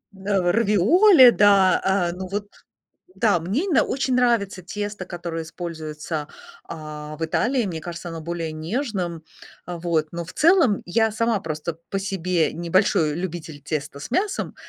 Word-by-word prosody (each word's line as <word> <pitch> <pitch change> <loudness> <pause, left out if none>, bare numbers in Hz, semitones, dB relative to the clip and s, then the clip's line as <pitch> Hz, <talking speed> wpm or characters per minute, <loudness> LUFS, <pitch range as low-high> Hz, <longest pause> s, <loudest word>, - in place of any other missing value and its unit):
Э, 190 -2 0
равиоли, 245 - +6
да, 200 -4 +5
а, 190 -3 +1
ну 185 +1 -6
вот 205 +2 -4 0.7
да, 210 -7 +2
мне 205 - -1
именно 345 -8 +3
очень 260 -1 -1
нравится 220 -7 +1
тесто, 205 0 -5
которое 170 -2 -5
используется, 155 -2 -6 0.4
а, 150 -1 -8
в 165 - -4
Италии. 245 +9 +1
Мне 165 -3 -4
кажется, 175 +1 -7
оно 165 -1 -6
более 165 -1 -4
нежным. 175 - -3 0.4
А 175 -1 -5
вот, 165 -2 0
но, 170 0 -5
в - - -11
целом, 325 - +4
я 220 +4 +1
сама 230 0 0
просто 155 0 -5
по 195 - -1
себе 185 -4 0
не 170 +1 -6
большой 165 -5 +3
любитель 165 -4 -6
теста 140 -1 -4
с - - -8
мясом, 390 - -1
180 Hz, 155 wpm, -23 LUFS, 165-210 Hz, 0.7 s, равиоли